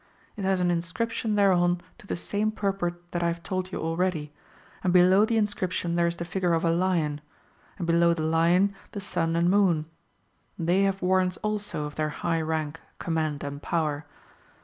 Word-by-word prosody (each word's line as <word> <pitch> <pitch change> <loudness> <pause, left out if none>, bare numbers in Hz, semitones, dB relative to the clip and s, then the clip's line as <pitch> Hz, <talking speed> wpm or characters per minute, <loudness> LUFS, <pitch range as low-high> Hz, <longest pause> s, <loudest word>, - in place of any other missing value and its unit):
It 205 - -5
has 190 -1 +2
an 175 0 +2
inscription 210 +6 -1
thereon 180 -3 +3 0.2
to 205 - -15
the - - -2
same 205 +5 -1
purport 175 -4 -3
that 175 - -2
I 170 - +2
have 170 0 -3
told 185 -1 -3
you - - -3
already, 165 -2 -1 0.5
and 180 - +2
below 185 +3 +6
the 225 0 0
inscription 185 -5 -1
there 170 0 +2
is 170 - -1
the 170 - -5
figure 175 0 0
of 165 +1 +1
a 165 - +3
lion, 165 -4 0 0.6
and 180 - -3
below 170 0 +4
the 160 - -3
lion 170 +5 +3 0.2
the 205 - -4
sun 165 -4 -1
and 170 +1 +2
moon. 180 -5 +3 0.7
They 175 +3 +2
have 195 -1 -1
warrants 185 0 +2
also 210 -7 -2
of 150 - -6
their 155 -1 0
high 165 +2 -1
rank, 160 0 -2 0.2
command, 155 -3 -2
and 140 0 -5
power. 155 -3 -1
175 Hz, 185 wpm, -27 LUFS, 165-190 Hz, 0.7 s, below